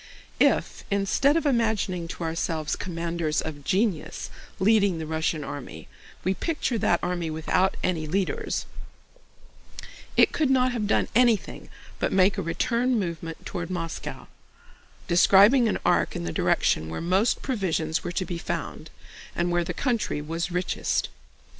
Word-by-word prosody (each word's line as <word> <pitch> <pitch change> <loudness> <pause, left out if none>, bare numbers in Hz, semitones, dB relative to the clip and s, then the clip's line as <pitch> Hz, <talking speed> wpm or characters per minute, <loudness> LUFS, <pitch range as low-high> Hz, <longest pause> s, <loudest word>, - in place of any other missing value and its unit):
If - - +2
instead 200 +9 +2
of 330 - -1
imagining 220 - 0
to 170 - -6
ourselves 160 -1 -2
commanders 170 -3 -2
of 145 -2 -5
genius 190 -1 -1 0.3
leading 200 -2 +3
the 160 - -4
Russian 160 0 -1
army, 145 -2 -8 0.4
we 190 - +1
picture 265 - -2
that 175 - +2
army 175 -2 -1
without 160 +4 0
any 160 -4 -1
leaders, 190 +4 -1 1.5
it - - +6
could 305 -4 +1
not 255 -1 +3
have 225 -4 -2
done - - +2
anything 235 -3 +2 0.3
but - - 0
make 190 +1 +3
a - - 0
return 235 +9 0
movement 165 -4 -4
toward 175 -1 -4
Moscow, 165 -3 -5 0.8
describing 200 +7 +6
an 215 - 0
arc - - +2
in - - -3
the 85 -1 -3
direction 80 +1 +1
where 80 - -4
most 185 +7 +1
provisions 175 - -1
were - - -3
to 185 +1 -2
be 170 0 -4
found 160 -2 -5 0.5
and 175 0 0
where 175 0 +2
the - - -4
country 235 - -1
was 165 +4 -3
richest. 180 0 -1
180 Hz, 145 wpm, -26 LUFS, 165-215 Hz, 1.5 s, it